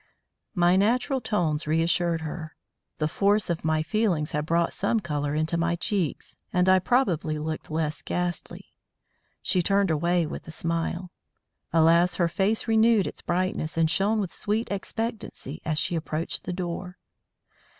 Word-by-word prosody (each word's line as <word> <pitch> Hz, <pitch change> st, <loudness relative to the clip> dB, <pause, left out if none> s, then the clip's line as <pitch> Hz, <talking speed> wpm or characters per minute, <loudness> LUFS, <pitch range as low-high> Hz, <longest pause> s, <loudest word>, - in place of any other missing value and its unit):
My 175 Hz, 0 st, +4 dB
natural 250 Hz, +6 st, +2 dB
tones 160 Hz, -10 st, 0 dB
reassured 165 Hz, +1 st, +1 dB
her. 160 Hz, -1 st, -6 dB, 0.4 s
The 155 Hz, -, 0 dB
force 200 Hz, +3 st, +2 dB
of 170 Hz, -, -3 dB
my 155 Hz, 0 st, +1 dB
feelings 170 Hz, -4 st, 0 dB
had 150 Hz, +1 st, -2 dB
brought 170 Hz, +1 st, +1 dB
some 210 Hz, +3 st, +1 dB
colour 145 Hz, -5 st, -2 dB
into 155 Hz, +2 st, 0 dB
my 170 Hz, +1 st, +1 dB
cheeks, 175 Hz, -2 st, -2 dB
and 180 Hz, +1 st, +2 dB
I 185 Hz, 0 st, +6 dB
probably 180 Hz, -, +1 dB
looked 155 Hz, +1 st, -4 dB
less 155 Hz, -1 st, -2 dB
ghastly. 175 Hz, -1 st, -4 dB, 0.7 s
She 185 Hz, -, +2 dB
turned 195 Hz, 0 st, +2 dB
away 170 Hz, +2 st, +2 dB
with 155 Hz, -, -7 dB
a -, -, -7 dB
smile. 170 Hz, +2 st, -2 dB, 0.6 s
Alas! 170 Hz, +2 st, +4 dB
her 175 Hz, -, +2 dB
face 200 Hz, +7 st, 0 dB
renewed 225 Hz, -2 st, +4 dB
its -, -, -6 dB
brightness 175 Hz, -3 st, -1 dB
and 160 Hz, -1 st, +3 dB
shone 210 Hz, +4 st, +2 dB
with 195 Hz, -4 st, -3 dB
sweet 215 Hz, +2 st, -2 dB
expectancy 205 Hz, -, -4 dB
as 155 Hz, -1 st, -1 dB
she 170 Hz, -, 0 dB
approached 160 Hz, 0 st, -3 dB
the 180 Hz, -, -3 dB
door. 180 Hz, 0 st, -5 dB
175 Hz, 150 wpm, -26 LUFS, 160-195 Hz, 0.7 s, I